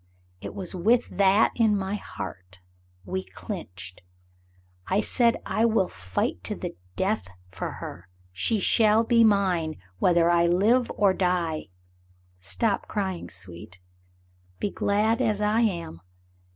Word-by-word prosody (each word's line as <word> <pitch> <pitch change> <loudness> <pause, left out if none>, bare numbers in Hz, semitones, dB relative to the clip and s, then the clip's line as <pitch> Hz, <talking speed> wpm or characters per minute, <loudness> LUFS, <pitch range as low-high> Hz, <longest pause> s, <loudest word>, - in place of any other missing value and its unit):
It - - -7
was 185 -3 -5
with 225 +7 +2
that 200 +2 +5
in 220 -3 +3
my 190 0 -3
heart, 95 - -7 0.5
we 95 0 -3
clinched. 90 -1 -8 0.9
I 195 - +2
said 235 +2 +2
I 225 - +1
will 220 -5 +2
fight 95 - -3
to - - -3
the - - -6 0.2
death 205 - -1 0.2
for - - -5
her. 90 +2 -9 0.2
She 150 - 0
shall 215 +2 +4
be 230 0 +4
mine 185 -7 +2 0.2
whether 170 -1 +4
I 170 0 +4
live 220 +8 +3
or 200 -2 +4
die. 180 -4 -1 0.7
Stop 200 - -1
crying, 190 -4 -3
sweet; 90 -1 -10 0.8
be 200 - -1
glad 215 +4 +1
as 215 -4 +1
I 210 +2 +2
am. 170 - -2
190 Hz, 130 wpm, -26 LUFS, 155-215 Hz, 0.9 s, that